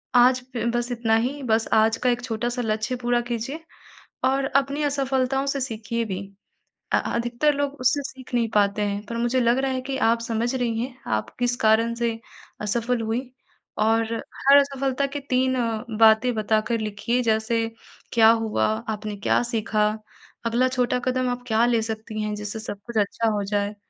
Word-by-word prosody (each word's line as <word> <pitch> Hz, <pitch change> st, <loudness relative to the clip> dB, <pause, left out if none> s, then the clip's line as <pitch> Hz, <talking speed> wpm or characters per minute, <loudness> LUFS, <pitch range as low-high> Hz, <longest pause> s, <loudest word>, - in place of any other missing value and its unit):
आज 250 Hz, +1 st, +6 dB
फ 230 Hz, -1 st, -1 dB
बस 240 Hz, +1 st, -1 dB
इतना 230 Hz, -2 st, +1 dB
ही 285 Hz, +2 st, -6 dB
बस 225 Hz, -2 st, +1 dB
आज 220 Hz, +1 st, +4 dB
का 250 Hz, -, +4 dB
एक 245 Hz, 0 st, 0 dB
छोटा-सा 240 Hz, +1 st, -2 dB
लक्ष्य 220 Hz, +1 st, -1 dB
पूरा 240 Hz, 0 st, +2 dB
कीजिए 245 Hz, +7 st, -4 dB, 0.6 s
और 270 Hz, +1 st, +2 dB
अपनी 275 Hz, +2 st, +1 dB
असफलताओं 270 Hz, -1 st, 0 dB
से 275 Hz, 0 st, -1 dB
सीखिए 230 Hz, -2 st, -3 dB
भी 190 Hz, -4 st, -4 dB, 0.8 s
अ, -, -, +6 dB
अधिकतर 240 Hz, +5 st, 0 dB
लोग 285 Hz, 0 st, -1 dB
उससे 265 Hz, +3 st, +2 dB
सीख 260 Hz, -2 st, -10 dB
नहीं 235 Hz, -2 st, +1 dB
पाते 205 Hz, 0 st, +3 dB
हैं, 200 Hz, 0 st, -2 dB
पर 230 Hz, +2 st, -5 dB
मुझे 240 Hz, +2 st, +1 dB
लग 235 Hz, +1 st, +3 dB
रहा 270 Hz, 0 st, 0 dB
है 260 Hz, 0 st, -2 dB
कि 265 Hz, +1 st, -4 dB
आप 230 Hz, -2 st, +3 dB
समझ 230 Hz, +2 st, -1 dB
रही 235 Hz, -3 st, -1 dB
हैं, 250 Hz, +2 st, -4 dB
आप 110 Hz, -1 st, -1 dB
किस 245 Hz, 0 st, +1 dB
कारण 225 Hz, +2 st, +4 dB
से 235 Hz, -1 st, -1 dB, 0.4 s
असफल 235 Hz, +3 st, 0 dB
हुई 225 Hz, +2 st, -1 dB, 0.6 s
और 225 Hz, +1 st, +2 dB, 0.2 s
हर 275 Hz, +1 st, +6 dB
असफलता 275 Hz, -1 st, +1 dB
के -, -, -1 dB
3 260 Hz, +1 st, +2 dB, 0.5 s
बातें 220 Hz, +2 st, +6 dB
बता 215 Hz, 0 st, +2 dB
कर 230 Hz, -1 st, +1 dB
लिखिए 215 Hz, +4 st, -1 dB
जैसे 225 Hz, 0 st, +1 dB, 0.5 s
क्या 225 Hz, -2 st, +7 dB
हुआ? 225 Hz, -1 st, +2 dB, 0.2 s
आपने 210 Hz, -1 st, -4 dB
क्या 200 Hz, -, +2 dB
सीखा? 220 Hz, -3 st, 0 dB, 0.6 s
अगला 235 Hz, +3 st, +2 dB
छोटा 250 Hz, -1 st, 0 dB
कदम 255 Hz, 0 st, +1 dB
आप 245 Hz, 0 st, -3 dB
क्या 225 Hz, 0 st, +3 dB
ले 235 Hz, -2 st, +2 dB
सकती 220 Hz, 0 st, -4 dB
हैं? 210 Hz, 0 st, -2 dB
जिससे 210 Hz, +1 st, -5 dB
सब 205 Hz, -2 st, -6 dB
कुछ 235 Hz, -, -4 dB
अच्छा 215 Hz, +2 st, +1 dB
हो 205 Hz, -1 st, -1 dB
जाए। 205 Hz, +1 st, -1 dB
235 Hz, 180 wpm, -24 LUFS, 220-255 Hz, 0.8 s, क्या